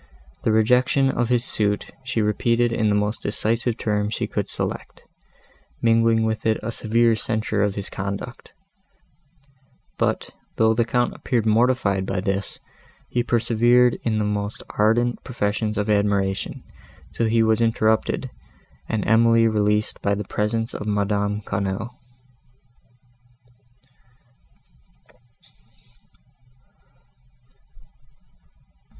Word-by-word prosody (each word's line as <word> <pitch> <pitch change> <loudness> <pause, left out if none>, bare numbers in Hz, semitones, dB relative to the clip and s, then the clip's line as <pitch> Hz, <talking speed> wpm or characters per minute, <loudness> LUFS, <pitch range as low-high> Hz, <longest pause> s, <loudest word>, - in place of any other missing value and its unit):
The - - +1
rejection 125 +5 +3
of 120 -2 -1
his 120 -1 +2
suit 105 -1 -1
she 120 -4 -1
repeated 115 +3 +1
in 110 -2 +1
the 105 - +2
most 105 +1 -1
decisive 115 +3 -1
terms 105 -1 -1
she - - -2
could - - -3
select, - - -5 0.8
mingling 115 0 +3
with 110 0 -1
it 110 -1 +2
a 115 - -2
severe 115 +1 +2
censure 110 -1 -1
of 100 -1 +1
his 100 -1 -4
conduct; 100 +6 -6 1.5
but, - - -1 0.2
though 110 0 +3
the 115 +1 +1
Count 120 +2 0
appeared 120 -4 -1
mortified 110 -4 +2
by 95 - -1
this, 100 +1 -3 0.5
he 120 - 0
persevered 120 +1 +3
in 110 -2 -1
the 105 - +1
most 105 0 -3
ardent 120 +3 +1
professions 105 -2 -2
of 105 0 -1
admiration, 100 -2 0 0.5
till 115 - 0
he 115 0 +3
was 110 +1 +2
interrupted 110 -1 +1 0.6
and 110 -3 -1
Emily 115 +1 +5
released 105 -1 0
by 100 0 +1
the 105 - -4
presence 115 +3 -2
of 105 - -5
Madame 105 0 0
Quesnel. 100 +3 -3
110 Hz, 110 wpm, -23 LUFS, 105-115 Hz, 1.5 s, Emily